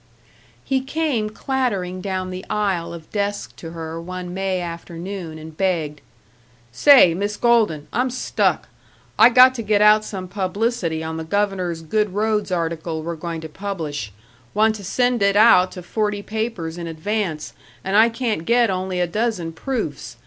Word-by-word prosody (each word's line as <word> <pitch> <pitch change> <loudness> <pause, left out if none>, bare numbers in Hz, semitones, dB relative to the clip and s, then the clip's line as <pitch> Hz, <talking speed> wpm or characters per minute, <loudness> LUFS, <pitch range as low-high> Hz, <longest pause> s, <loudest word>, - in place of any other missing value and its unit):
§ - - -34
5 - - -34 0.6
He 265 -1 0
came 270 -6 -1
clattering 215 -7 -2
down 185 -1 -3
the 185 +1 -6
aisle 190 -5 -1
of 165 -2 -10
desks 205 -1 -2
to 165 - -8
her 165 0 -6
one 180 0 -6
May 190 0 -1
afternoon, 170 0 -6
and 155 0 -10
begged, 160 -6 -1 0.7
"Say, 180 - +7
Miss 205 +4 -2
Golden, 220 -11 +2
I'm 250 +2 +1
stuck. 255 - 0 0.5
I 225 +2 +9
got 255 +1 +7
to 245 - -4
get 210 -1 +2
out 210 +1 +6
some 190 -3 -6
publicity 190 -3 -1
on 160 0 -4
the 160 - -4
Governor's 185 -2 -1
good 210 +3 0
roads 210 -1 0
article 165 -2 -2
we're 170 +1 -3
going 165 0 -5
to 160 - -6
publish; 155 - -5 0.4
want 220 +1 +4
to 200 - -10
send 245 +4 +1
it 200 0 +3
out 195 -4 +6
to 180 - -8
forty 210 +2 -2
papers 210 -7 -4
in 170 - -5
advance, 165 -1 -3 0.3
and 190 +1 -1
I 220 +2 +6
can't 230 -7 -2
get 235 +2 +3
only 185 0 -2
a 180 - +2
dozen 180 -3 -2
proofs. 215 - -4
190 Hz, 170 wpm, -21 LUFS, 165-215 Hz, 0.7 s, I